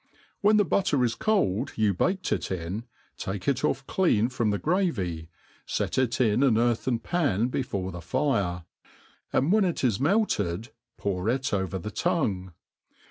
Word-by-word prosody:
When 210 +1 +5
the 205 - +4
butter 155 -6 +2
is 120 -2 +1
cold 115 - 0
you 105 -2 +2
baked 185 - 0
it - - -1
in, 95 +5 -4 0.3
take 95 0 -5
it 135 -1 +1
ofF 140 -2 0
clean 120 - +2
from 115 -4 0
the 100 - +1
gravy, 100 - -1 0.4
fet - - -1
It 125 -3 0
in 115 -1 +3
an 130 -6 +4
earthen 120 +1 +1
pan 120 - 0
before 100 -8 -2
the 85 -1 -7
fire; 90 - 0 0.7
and 140 +6 +2
when 215 0 +4
it 175 -6 -1
is 115 -6 +2
melted, 130 - +1 0.3
pour 100 0 -1
it 130 0 -1
over 95 -2 -1
the 100 +4 -6
tongue. 110 - -1
115 Hz, 160 wpm, -27 LUFS, 95-150 Hz, 0.7 s, When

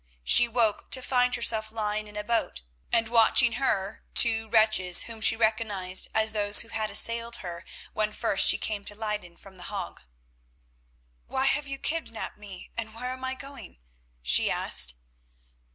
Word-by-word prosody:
She 65 - +7
awoke 230 -3 -1
to 260 - +1
find 250 -1 +1
herself 220 -2 0
lying 215 -1 -3
in 210 0 -11
a 210 - -4
boat, 225 - -2 0.3
and 225 -1 +1
watching 235 +1 +4
her, 200 -5 -2
two 225 -2 +4
wretches, 215 -5 +3
whom 225 -1 -8
she 220 - +4
recognised 215 -5 0
as 220 0 +2
those 205 -1 +3
who 230 - -8
had 220 -1 -3
assailed 230 +1 +2
her 170 0 -7 0.3
when 215 0 -1
first 215 -3 +3
she - - +5
came 210 -2 -4
to 205 - -8
Leyden 210 -5 -5
from 195 -1 -15
The 180 - -10
Hague. - - -7 1.3
"Why 265 - -1
have 290 +1 +1
you 275 0 -6
kidnapped 300 -8 -4
me, 195 -3 -12
and 225 -1 -6
where 250 +2 -5
am 260 0 -9
I 260 0 -3
going?" 275 - -11 0.5
she - - +4
asked. 60 -1 +2
220 Hz, 170 wpm, -26 LUFS, 205-235 Hz, 1.3 s, She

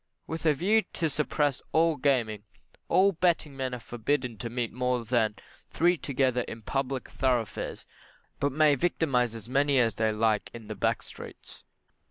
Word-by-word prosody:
With 165 0 -3
a 150 - +4
view 205 +9 +3
to 160 -2 -1
suppressing 145 -2 0
all 165 0 +4
gaming, 120 -7 0 0.5
all 190 +3 +5
betting 165 -5 0
men 130 -2 -2
are - - -7
forbidden 120 0 -2
to 115 - -4
meet 120 -1 -3
more 125 -1 -1
than 110 -3 +1 0.3
three 175 +3 +3
together 130 -5 0
in 110 - -8
public 135 +1 -2
thoroughfares, 125 -5 -1 0.5
but 140 - +1
may 150 +1 +4
victimise 135 -6 +1
as 115 -1 -9
many 140 +2 +2
as 115 -5 +2
they 110 -1 +2
like 110 -1 +1
in 115 -2 -9
the - - -3
back 95 - 0
streets. - - -12
130 Hz, 165 wpm, -28 LUFS, 115-150 Hz, 0.5 s, all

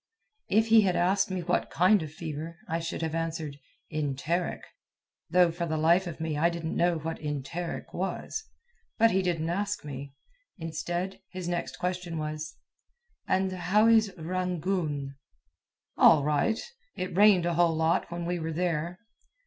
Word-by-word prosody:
If 220 +2 +3
he 225 0 +8
had 185 -3 +2
asked 195 +3 +2
me 185 -1 -2
what 170 - 0
kind 185 +4 +4
of 155 -2 -6
fever, 160 +1 -6
I 165 - -1
should 165 0 -4
have 160 -1 -2
answered, 160 -3 -3 0.3
"Enteric," 155 +3 -1 0.7
though 175 0 +5
for 170 +1 -3
the 160 -1 -1
life 170 +4 +4
of 165 -1 -6
me 160 -1 -2
I 165 +3 +3
didn't 170 -1 -4
know 175 -1 +2
what 160 +1 -4
enteric 150 +3 -4
was. 190 - -3 0.5
But 230 0 +5
he 190 - +2
didn't 170 -3 -1
ask 200 -1 -2
me. 140 -1 -7 0.4
Instead, 175 +2 -3
his 185 -2 -6
next 135 -7 -3
question 180 -1 -3
was: 155 0 -4 0.7
"And 190 0 +1
how 185 +4 +3
is 220 -3 +5
Rangoon?" 170 -5 -2 0.8
"All 155 -3 +7
right. 150 +10 +2 0.4
It 185 -2 -4
rained 200 -3 +6
a 175 - +1
whole 170 -1 +3
lot 160 +1 +1
when 170 0 -4
we 175 0 -1
were 160 0 -3
there." 170 0 -1
170 Hz, 155 wpm, -28 LUFS, 160-185 Hz, 0.8 s, he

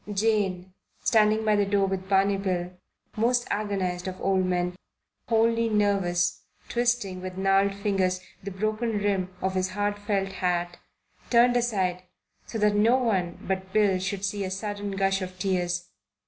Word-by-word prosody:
Jane, 195 -3 0 0.3
standing 215 0 +3
by 215 -1 +4
the 205 - +3
door 200 0 +2
with 190 0 -3
Barney 195 0 +3
Bill, 180 -2 -2 0.4
most 240 +2 +2
agonized 190 -4 -2
of 185 0 -5
old 190 -1 +1
men, 180 0 0 0.5
wholly 230 0 +2
nervous, 195 -4 +1 0.3
twisting 235 -6 0
with 185 0 -6
gnarled 195 +1 +2
fingers 195 -2 0 0.2
the 200 - -5
broken 215 +3 -1
rim 200 -3 0
of 190 0 0
his 185 0 0
hard 205 +1 -2
felt 200 -2 -1
hat, 175 -2 -1 0.5
turned 245 +1 +5
aside 195 -7 0 0.5
so 225 - -4
that 210 -1 +3
no 220 +5 +4
one 190 -9 0
but 190 0 -2
Bill 205 -3 +3
should 195 +1 -3
see 200 0 -2
a 190 - -3
sudden 205 +1 -4
gush 195 0 +1
of 185 0 -6
tears. 180 - -1
195 Hz, 155 wpm, -26 LUFS, 185-210 Hz, 0.5 s, turned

